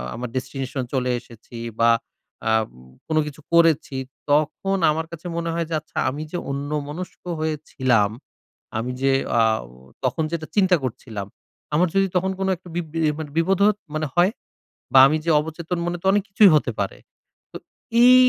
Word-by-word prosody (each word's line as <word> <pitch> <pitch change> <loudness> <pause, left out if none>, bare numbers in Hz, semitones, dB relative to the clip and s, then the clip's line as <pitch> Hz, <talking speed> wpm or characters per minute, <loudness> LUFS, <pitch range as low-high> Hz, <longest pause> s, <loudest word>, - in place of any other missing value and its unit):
আমার 125 +1 -5
destination 130 +1 -3
এ - - -35
চলে 125 -1 +1
এসেছি 120 0 -13 0.2
বা, 115 0 +5 0.6
আম 110 0 +3 0.4
কোন 155 - 0
কিছু 150 +1 -9
করেছি, 165 -4 +4 0.4
তখন 155 +6 +2
আমার 160 +1 -2
কাছে 170 +1 -7
মনে 170 0 -1
হয় 170 0 -1
যে, - - -4
আচ্ছা, - - -15
আমি 145 +3 -5
যে 175 - -2
অন্যমনস্ক 145 +4 -4 0.2
হয়েছিলাম, 130 -8 +1 0.7
আমি 120 +3 -2
যে 135 0 +3 0.3
আও 110 - +1 0.4
তখন 160 - 0
যেটা 160 -2 -3
চিন্তা 190 -3 +5
করছিলাম, 110 -5 -5 0.5
আমার 175 +4 +4
যদি 195 0 +4
তখন 190 +1 +2
কোনো 190 0 0
একটা 180 +1 -15
বি 175 - +1
বি 165 - -2 0.2
মানে 155 -2 -5
বিপদ 185 +3 +3
হতো 210 0 +3 0.2
মানে 155 0 0
হয়? 175 +4 +5 0.6
বা, 130 - +9
আমি 155 +3 +1
যে - - +1
অবচেতন 160 +3 -4
মনে 175 0 -2
তো - - -12
অনেক 205 0 +2
কিছুই 195 -1 +7
হতে 135 -4 +2
পারে। 100 - -2 0.5
তো - - -6 0.5
এই 250 +1 +9
155 Hz, 170 wpm, -23 LUFS, 130-175 Hz, 0.7 s, বা